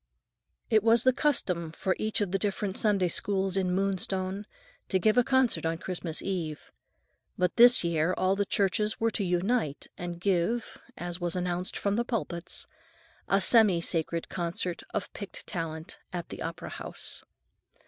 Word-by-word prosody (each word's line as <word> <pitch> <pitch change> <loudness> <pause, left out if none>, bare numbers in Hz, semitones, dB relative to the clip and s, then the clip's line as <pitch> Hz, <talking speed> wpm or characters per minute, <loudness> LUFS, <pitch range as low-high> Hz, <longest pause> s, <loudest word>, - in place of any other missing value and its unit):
It 220 -1 +5
was 230 +2 +5
the 255 - +5
custom 180 - +1
for 185 +3 -1
each 215 0 0
of 200 -3 0
the 195 - +1
different 200 0 -1
Sunday 200 -4 +2
Schools 195 +2 +1
in 185 -2 +1
Moonstone 190 +1 -1 0.4
to 190 - +3
give 215 +4 +3
a 245 - +5
concert 260 -2 +2
on 165 0 0
Christmas 175 -2 -4
Eve. 170 -6 -4 0.7
But 180 -1 +1
this 245 -1 +8
year 165 0 +1
all 185 +1 +2
the 200 - +1
churches 210 +2 +1
were 230 0 +2
to 205 - 0
unite 180 - 0
and 175 -1 -5
give, 195 +5 0 0.2
as 175 0 -5
was 175 0 0
announced 180 0 -1
from 200 +1 0
the 235 - +2
pulpits, 185 -8 -3 0.6
"a 195 - +3
semi 200 -3 +5
sacred 165 0 -1
concert 175 0 -3
of 200 - -3
picked 200 - -8
talent" 160 -2 -5
at 175 -2 -5
the - - -8
opera 165 0 -5
house. - - -5
190 Hz, 160 wpm, -29 LUFS, 175-210 Hz, 0.7 s, this